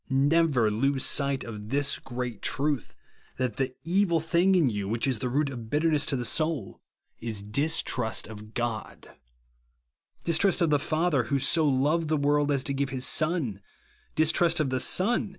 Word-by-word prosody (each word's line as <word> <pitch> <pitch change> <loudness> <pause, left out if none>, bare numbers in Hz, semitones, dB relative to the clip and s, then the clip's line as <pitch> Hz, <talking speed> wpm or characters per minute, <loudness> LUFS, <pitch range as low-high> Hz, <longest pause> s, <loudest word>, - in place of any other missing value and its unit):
Never 140 -4 +2
lose 135 +5 +1
sight 140 -1 +1
of 105 -2 -8
this 140 +2 +1
great 125 -3 -6
truth, 145 -2 -2 0.4
that 125 -4 -2
the 130 -1 -2
evil 170 0 +1
thing 170 +4 +2
in 170 -6 +3
you, 105 -4 -2
which 115 +3 -1
is 130 -5 0
the 125 - -2
root 140 +2 0
of 115 -4 -8
bitter 155 +4 +1
ness 150 -1 +2
to 140 - +1
the 125 -2 -2
soul, 155 - 0 0.4
is 110 -3 -4
distrust 125 0 0
of 105 0 -11
God; 120 -2 -4 1.1
dis 165 -2 +1
trust 195 -1 +3
of 170 -4 +2
the 145 - +3
Father, 155 -4 0
who 140 +4 0
so 150 +4 +2
loved 145 +5 +1
the 155 0 +1
world 145 0 +1
as 135 -2 +1
to 140 - -2
give 140 0 -1
his 130 -1 -2
Son; 155 - 0 0.5
distrust 165 +2 +3
of 145 -4 0
the 130 - 0
Son. 210 - +1
140 Hz, 180 wpm, -27 LUFS, 120-160 Hz, 1.1 s, in